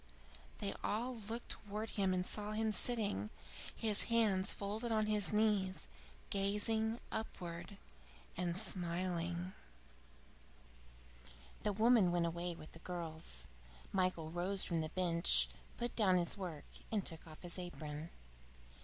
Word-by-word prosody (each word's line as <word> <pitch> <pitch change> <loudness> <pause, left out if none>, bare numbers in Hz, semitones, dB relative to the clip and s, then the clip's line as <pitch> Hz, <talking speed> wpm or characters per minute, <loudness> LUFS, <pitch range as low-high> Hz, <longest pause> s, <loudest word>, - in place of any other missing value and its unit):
They - - -2
all 240 +4 0
looked 225 +2 -5
towards 210 +2 -3
him 195 -2 +2
and 180 0 +1
saw 210 +1 -1
him 220 0 +1
sitting, 205 - 0 0.5
his 215 -2 +3
hands 210 -5 +4
folded 215 +4 -2
on 215 -1 +3
his 210 -2 +2
knees, 210 -3 +2 0.4
gazing 220 +3 +1
upwards 175 -4 -4 0.6
and 175 0 0
smiling. 175 -2 0
X - - -23 0.3
The 210 - +1
woman 220 -3 +5
went 175 -1 +2
away 170 +1 -2
with 155 - -11
the 165 - -12
girls. 160 - -3 0.5
Michael 185 -4 +1
rose 185 +3 +4
from 170 -2 0
the 155 - -2
bench, 170 -1 +4 0.3
put 240 0 -2
down 190 -5 +5
his 175 -1 +1
work, 175 -7 -5 0.3
and 210 -4 +1
took 165 0 -2
off 155 +2 -12
his 175 +1 -3
apron. 155 -3 -5
185 Hz, 130 wpm, -38 LUFS, 165-210 Hz, 0.6 s, woman